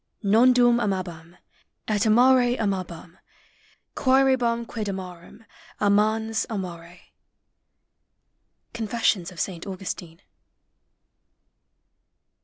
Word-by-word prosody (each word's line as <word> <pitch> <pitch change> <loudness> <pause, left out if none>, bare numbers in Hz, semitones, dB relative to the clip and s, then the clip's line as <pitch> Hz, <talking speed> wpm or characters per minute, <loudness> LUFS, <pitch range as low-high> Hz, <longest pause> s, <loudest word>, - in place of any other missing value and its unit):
Nondum 240 +3 +4
aniabam, 175 -5 -4 0.5
et 215 +1 0
amare 245 +2 +4
amabani, 185 -5 -4 0.7
quaerebam 260 -3 +2
quid 215 -2 -5
amarem, 185 +2 -9 0.3
amans 215 +2 +1
amare.'' 180 -4 -7 0.9
— - - -51
Confessions 220 -5 -1
of 175 - -12
Saint 175 +1 -4
Augustine. 185 -2 -7
210 Hz, 70 wpm, -24 LUFS, 180-235 Hz, 0.9 s, Nondum